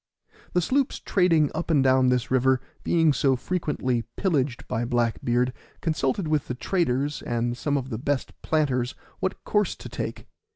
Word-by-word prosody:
The 180 Hz, -, +3 dB
sloops 265 Hz, -, +1 dB
trading 165 Hz, -6 st, +3 dB
up 160 Hz, +2 st, -3 dB
and 145 Hz, -5 st, +4 dB
down 130 Hz, -1 st, +4 dB
this 125 Hz, -1 st, 0 dB
river 130 Hz, 0 st, +3 dB, 0.2 s
being 165 Hz, -3 st, +3 dB
so 135 Hz, 0 st, +3 dB
frequently 130 Hz, -5 st, -1 dB, 0.2 s
pillaged 145 Hz, -9 st, 0 dB
by 115 Hz, -, -1 dB
Black 120 Hz, -1 st, 0 dB
beard, 125 Hz, +1 st, +1 dB, 0.3 s
consulted 160 Hz, +1 st, 0 dB
with 155 Hz, -2 st, 0 dB
the 125 Hz, -, -3 dB
traders 145 Hz, -1 st, 0 dB
and 120 Hz, 0 st, -1 dB
some 145 Hz, +3 st, 0 dB
of 135 Hz, -1 st, -4 dB
the 110 Hz, -, -3 dB
best 140 Hz, 0 st, -1 dB
planters 130 Hz, -6 st, 0 dB, 0.2 s
what 190 Hz, -, -2 dB
course 210 Hz, -1 st, +1 dB
to -, -, -9 dB
take. -, -, -5 dB
135 Hz, 165 wpm, -26 LUFS, 125-160 Hz, 0.3 s, and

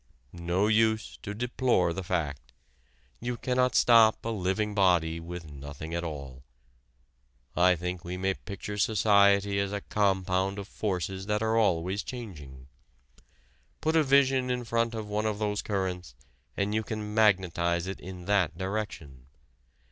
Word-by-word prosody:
No 85 Hz, +3 st, 0 dB
use 110 Hz, +1 st, +1 dB
to 105 Hz, -, -6 dB
deplore 120 Hz, -6 st, +1 dB
the 95 Hz, -, -4 dB
fact. 70 Hz, -8 st, -3 dB, 0.7 s
You 120 Hz, 0 st, -3 dB
cannot 125 Hz, 0 st, +1 dB
stop 115 Hz, -2 st, +5 dB
a -, -, -1 dB
living 105 Hz, 0 st, -1 dB
body 90 Hz, -5 st, +2 dB
with 85 Hz, -1 st, -8 dB
nothing 70 Hz, +3 st, -8 dB
at 85 Hz, 0 st, -2 dB
all. 70 Hz, -5 st, -7 dB, 1.1 s
I 90 Hz, +1 st, +5 dB
think 90 Hz, +1 st, -4 dB
we 90 Hz, +1 st, -5 dB
may 95 Hz, +1 st, 0 dB
picture 105 Hz, +1 st, -7 dB
society 100 Hz, -1 st, +4 dB
as 100 Hz, 0 st, -1 dB
a 100 Hz, 0 st, -3 dB
compound 95 Hz, -1 st, 0 dB
of 100 Hz, -1 st, -6 dB
forces 95 Hz, -2 st, -3 dB
that 105 Hz, +1 st, 0 dB
are 110 Hz, 0 st, +1 dB
always 95 Hz, -2 st, +1 dB
changing. 75 Hz, -, -9 dB, 1.1 s
Put 160 Hz, +1 st, 0 dB
a 160 Hz, -, +6 dB
vision 135 Hz, -2 st, +3 dB
in 125 Hz, -1 st, -1 dB
front 115 Hz, 0 st, 0 dB
of 110 Hz, -1 st, -5 dB
one 105 Hz, +1 st, -1 dB
of 105 Hz, -1 st, -1 dB
these 105 Hz, -1 st, -1 dB
currents 90 Hz, -, -3 dB, 0.4 s
and 100 Hz, +1 st, 0 dB
you 110 Hz, -, +1 dB
can 105 Hz, -1 st, -5 dB
magnetize 90 Hz, -5 st, +2 dB
it 95 Hz, 0 st, -5 dB
in 90 Hz, -1 st, -9 dB
that 95 Hz, -5 st, +1 dB
direction. 95 Hz, -10 st, -5 dB
100 Hz, 150 wpm, -28 LUFS, 90-110 Hz, 1.1 s, a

